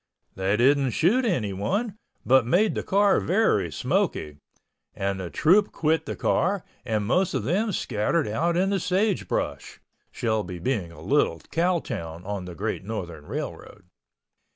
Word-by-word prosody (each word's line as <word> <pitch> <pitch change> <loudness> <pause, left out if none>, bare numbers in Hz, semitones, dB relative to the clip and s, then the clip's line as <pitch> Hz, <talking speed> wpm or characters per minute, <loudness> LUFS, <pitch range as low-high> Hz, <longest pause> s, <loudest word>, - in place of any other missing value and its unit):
They 95 +2 0
didn't 135 +2 +4
shoot 240 +10 +3
anyone 180 - -1 0.3
but 130 0 +5
made 180 - +2
the - - -2
car 200 0 +3
very 160 - +1
smoky, 125 - -1 0.6
and 95 0 -2
the 90 -2 -5
troupe 195 - +3
quit 160 +1 0
the - - -3
car 195 +1 0 0.2
and 110 -4 -1
most 180 - +1
of - - -1
them 210 +5 0
scattered 135 - 0
out 165 +11 0
in 190 +2 +2
the 195 - +1
sagebrush, 190 +3 -1 0.3
Shelby 110 -6 -2
being 95 -2 -2
a - - -13
little 85 - +2
cow 175 0 +1
town 85 -7 -6
on 100 -2 -4
the 90 -1 -8
Great 105 +2 -3
Northern 85 -8 -6
Railroad. 105 - -6
125 Hz, 150 wpm, -25 LUFS, -, 0.6 s, but